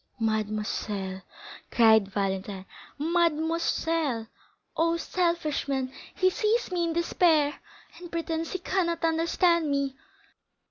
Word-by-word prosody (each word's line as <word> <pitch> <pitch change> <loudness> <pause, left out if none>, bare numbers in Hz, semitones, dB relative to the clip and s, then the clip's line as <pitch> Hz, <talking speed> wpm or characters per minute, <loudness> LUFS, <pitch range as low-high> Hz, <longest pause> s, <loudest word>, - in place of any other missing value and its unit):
"Mademoiselle," 210 -3 -2 0.5
cried 220 -3 +5
Valentine; 195 -1 -3 0.3
"mademoiselle! 325 -4 0 0.5
Oh, 335 +1 +2
selfish 340 -4 -1
man! 265 -1 -2 0.2
he 370 -1 +3
sees 450 +2 0
me 350 -1 +1
in 335 - -1
despair, 330 -3 +2 0.4
and 350 -1 -10
pretends 330 -1 -2
he - - 0
cannot 345 -2 -1
understand 330 0 +2
me!" 280 -1 0
320 Hz, 100 wpm, -27 LUFS, 225-340 Hz, 0.5 s, cried